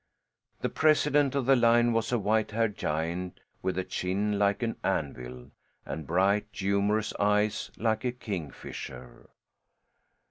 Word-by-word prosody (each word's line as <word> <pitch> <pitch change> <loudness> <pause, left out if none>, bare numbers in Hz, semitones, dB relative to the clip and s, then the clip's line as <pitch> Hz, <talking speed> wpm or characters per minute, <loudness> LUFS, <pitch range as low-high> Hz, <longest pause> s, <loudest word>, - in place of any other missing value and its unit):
The - - 0
president 150 -3 +3
of 140 -3 0
the 135 +1 +6
line 120 -1 +4
was 115 0 0
a 120 - +3
white 110 +1 +1
haired 110 -1 0
giant 85 +3 -3 0.2
with 95 -1 -2
a 95 - 0
chin 100 +3 -1
like 100 +3 +2
an 115 - -2
anvil 60 0 -3 0.3
and 80 -2 -6
bright 100 +5 +2
humorous 100 +2 0
eyes, 105 +1 +1
like 110 0 0
a 125 - 0
kingfisher. 90 - -7
105 Hz, 135 wpm, -29 LUFS, 95-115 Hz, 0.3 s, the